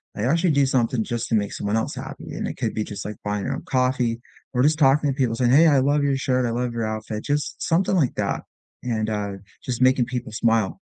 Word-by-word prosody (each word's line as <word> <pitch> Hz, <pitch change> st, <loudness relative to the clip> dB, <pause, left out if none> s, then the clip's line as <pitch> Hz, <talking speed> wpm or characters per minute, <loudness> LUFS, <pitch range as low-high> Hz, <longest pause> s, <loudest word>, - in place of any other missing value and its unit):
I 105 Hz, -, -3 dB
actually 165 Hz, +6 st, +2 dB
do 140 Hz, -1 st, +3 dB
something 125 Hz, -3 st, +1 dB
just 120 Hz, 0 st, -3 dB
to 115 Hz, -, +2 dB
make 100 Hz, -1 st, 0 dB
someone 105 Hz, +1 st, -2 dB
else 110 Hz, -, -2 dB
happy, -, -, -8 dB
and -, -, -3 dB
it -, -, -5 dB
could -, -, -2 dB
be 110 Hz, -, -1 dB
just, 105 Hz, -, -6 dB
like, 105 Hz, 0 st, -5 dB
buying 105 Hz, -1 st, -2 dB
'em 135 Hz, -, -1 dB
a -, -, -6 dB
coffee 125 Hz, -2 st, 0 dB, 0.3 s
or 125 Hz, -, +2 dB
just 155 Hz, +2 st, +3 dB
talking 145 Hz, +1 st, +4 dB
to 135 Hz, -, -4 dB
people 125 Hz, -5 st, 0 dB
saying, 120 Hz, 0 st, +2 dB
"Hey, 160 Hz, +5 st, +7 dB
I 140 Hz, -3 st, +5 dB
love 145 Hz, +2 st, +2 dB
your 140 Hz, -1 st, +2 dB
shirt, 130 Hz, -2 st, +1 dB
I 115 Hz, -, -1 dB
love 120 Hz, +1 st, -1 dB
your 115 Hz, -1 st, -2 dB
outfit." 110 Hz, 0 st, -4 dB
Just 145 Hz, +1 st, -2 dB
something 180 Hz, +3 st, +1 dB
like 145 Hz, -8 st, +1 dB
that -, -, -2 dB, 0.4 s
and, 110 Hz, -3 st, -1 dB
uh, 105 Hz, -2 st, -2 dB, 0.3 s
just 125 Hz, -1 st, -3 dB
making 130 Hz, -1 st, +4 dB
people 125 Hz, -2 st, -5 dB
smile, 115 Hz, -2 st, +1 dB
125 Hz, 245 wpm, -23 LUFS, 110-140 Hz, 0.4 s, Hey